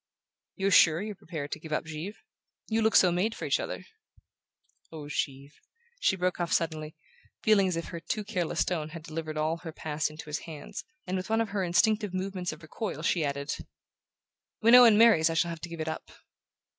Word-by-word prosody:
"You're 195 0 0
sure 165 -3 +6
you're 210 +2 -4
prepared 160 -6 -7
to - - -4
give 155 0 -10
up 155 - -1
Givre? 160 +6 -6 0.5
You 225 0 +1
look 220 0 +2
so 180 - +7
made 195 +6 0
for - - -5
each - - +2
other!" - - -5 1.1
"Oh, 155 -3 -8
Givre 140 -1 -3 0.3
" 470 +1 -36
She - - +3
broke 180 -1 -1
off 175 -1 -1
suddenly, 155 -1 -1 0.5
feeling 205 -3 +5
as 180 - -1
if 165 - -4
her 170 - -6
too 210 +5 -3
careless 185 -6 -1
tone 160 -4 -2
had 165 0 -9
delivered 155 -1 -5
all 155 +2 0
her 165 -1 -8
past 155 0 -2
into 155 +1 -10
his 150 0 -3
hands; 155 -3 -8 0.2
and 185 - -2
with 185 +2 -5
one 225 0 +2
of 225 -2 0
her 200 -1 -1
instinctive 195 +3 +2
movements 185 -1 -3
of 155 +1 -11
recoil 155 +1 -5
she 170 -1 +2
added: 140 0 -2 1.0
"When 230 +2 +5
Owen 240 -4 +9
marries 215 -8 +6
I 165 - -2
shall 170 +1 +2
have 165 -1 -6
to 175 - -6
give 170 -1 -7
it 155 - -3
up." 160 - -5
170 Hz, 205 wpm, -29 LUFS, 155-200 Hz, 1.1 s, Owen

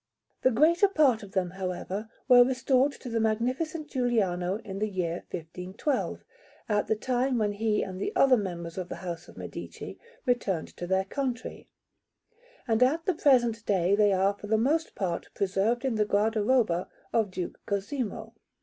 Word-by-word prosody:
The - - +5
greater 320 - +4
part 295 - +3
of 200 -2 -11
them, 180 -2 0
however, 190 +3 -4 0.2
were 245 -2 +9
restored 260 +2 +2
to - - -11
the 230 -1 -1
Magnificent 255 +9 -1
Giuliano 200 -9 0
in 195 -2 -5
the 215 +1 0
year 175 -3 -3
1512, 180 - -3 0.4
at 210 -1 +1
the 220 - +2
time 250 +3 0
when 210 -2 +1
he 210 0 0
and 185 0 -6
the - - -1
other 270 -2 +6
members 175 -5 -4
of 180 0 -5
the - - -4
House 175 0 -5
of - - -15
Medici - - -8 0.3
returned 200 - 0
to 175 - -5
their 190 +1 +1
country; 255 +1 -4 1.0
and 225 0 +1
at 310 +6 +3
the 375 - +2
present 240 -7 +3
day 190 -2 +2
they 205 -1 +4
are 195 +1 +3
for 205 +1 -10
the 220 +1 +3
most 305 +8 +1
part 180 -4 -3
preserved 200 +6 0
in 260 - +1
the 215 -1 +2
guardaroba 210 -2 +2 0.3
of 220 -3 +2
Duke 180 -1 -5
Cosimo. 220 +1 -3
215 Hz, 170 wpm, -28 LUFS, 190-255 Hz, 1.0 s, were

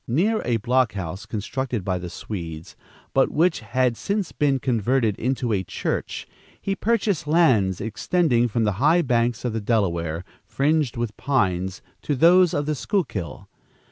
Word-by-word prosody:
Near 195 - +1
a 120 -1 +1
block 125 +2 +1
house 95 -1 -6
constructed 115 0 -3
by 90 -1 -1
the 90 0 -6
Swedes, 85 -5 -7 0.4
but 135 - +3
which 165 +2 +2
had 120 +2 0
since 200 - -2
been 140 -2 +1
converted 120 -3 +1
into 125 -2 -1
a 95 -2 0
church, 90 - -3 0.3
he 195 - -2
purchased 205 -7 0
lands 125 - +3
extending 120 - +1
from 115 0 0
the 105 - +2
high 165 +4 +4
banks 120 -2 0
of 120 - -1
the 110 - -2
Delaware, 85 -7 0 0.2
fringed 145 -3 0
with 115 -3 -3
pines, 95 -9 0 0.2
to 145 - -1
those 175 +5 +6
of 145 - -1
the 155 - 0
Schuylkill. 120 - -3
120 Hz, 155 wpm, -23 LUFS, 100-150 Hz, 0.4 s, those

